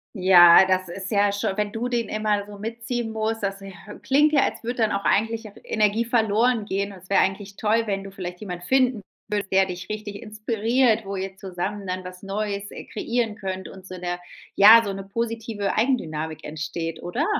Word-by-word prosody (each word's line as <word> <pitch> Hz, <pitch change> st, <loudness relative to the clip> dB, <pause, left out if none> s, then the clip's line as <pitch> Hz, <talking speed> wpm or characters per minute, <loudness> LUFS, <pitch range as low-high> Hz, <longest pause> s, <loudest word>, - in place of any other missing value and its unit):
Ja, 180 Hz, -2 st, +8 dB
das 185 Hz, 0 st, +1 dB
ist 190 Hz, +2 st, -6 dB
ja 205 Hz, -1 st, +3 dB
schon 200 Hz, 0 st, -2 dB
wenn 210 Hz, -1 st, -1 dB
du 235 Hz, +3 st, -3 dB
den 235 Hz, -3 st, -1 dB
immer 210 Hz, -1 st, 0 dB
so 205 Hz, 0 st, -11 dB
mitziehen 230 Hz, +2 st, -4 dB
musst, 220 Hz, 0 st, -2 dB
das 195 Hz, 0 st, -2 dB
äh, 195 Hz, 0 st, -9 dB, 0.3 s
klingt 285 Hz, +3 st, +3 dB
ja, 280 Hz, -, +5 dB
als -, -, -3 dB
würde 240 Hz, +2 st, -3 dB
dann 220 Hz, -3 st, +2 dB
auch 200 Hz, -, -1 dB
eigentlich 225 Hz, +1 st, +1 dB
auch -, -, -19 dB
Energie 215 Hz, +1 st, +1 dB
verloren 230 Hz, 0 st, +2 dB
gehen. 200 Hz, 0 st, -2 dB
Es 190 Hz, -1 st, -14 dB
wäre 195 Hz, -, +4 dB
eigentlich 195 Hz, +1 st, -2 dB
toll, 225 Hz, +2 st, +2 dB
wenn 195 Hz, -1 st, -2 dB
du 195 Hz, -, -9 dB
vielleicht 180 Hz, -2 st, -7 dB
jemand 180 Hz, -4 st, -6 dB
finden 255 Hz, +1 st, +2 dB, 0.3 s
würdest, 205 Hz, -2 st, -2 dB
der 190 Hz, 0 st, +4 dB
dich 180 Hz, 0 st, -7 dB
richtig 210 Hz, -1 st, -6 dB
inspiriert, 225 Hz, +1 st, +1 dB
wo 195 Hz, 0 st, -4 dB
ihr 190 Hz, 0 st, -5 dB
zusammen 195 Hz, +2 st, -5 dB
dann 185 Hz, 0 st, -4 dB
was 180 Hz, +1 st, -10 dB
Neues, 200 Hz, 0 st, -3 dB
äh, -, -, -9 dB
kreieren 235 Hz, -3 st, -2 dB
könnt 190 Hz, -2 st, -5 dB
und 190 Hz, -1 st, -12 dB
so 185 Hz, -, -8 dB
'ne 175 Hz, 0 st, -4 dB, 0.4 s
ja, 220 Hz, +3 st, +9 dB
so 200 Hz, -3 st, -3 dB
'ne 195 Hz, 0 st, -6 dB
positive 225 Hz, 0 st, -3 dB
Eigendynamik 160 Hz, -, -1 dB
entsteht, 160 Hz, +1 st, -5 dB
oder? 235 Hz, -, -1 dB
205 Hz, 200 wpm, -24 LUFS, 190-225 Hz, 0.4 s, ja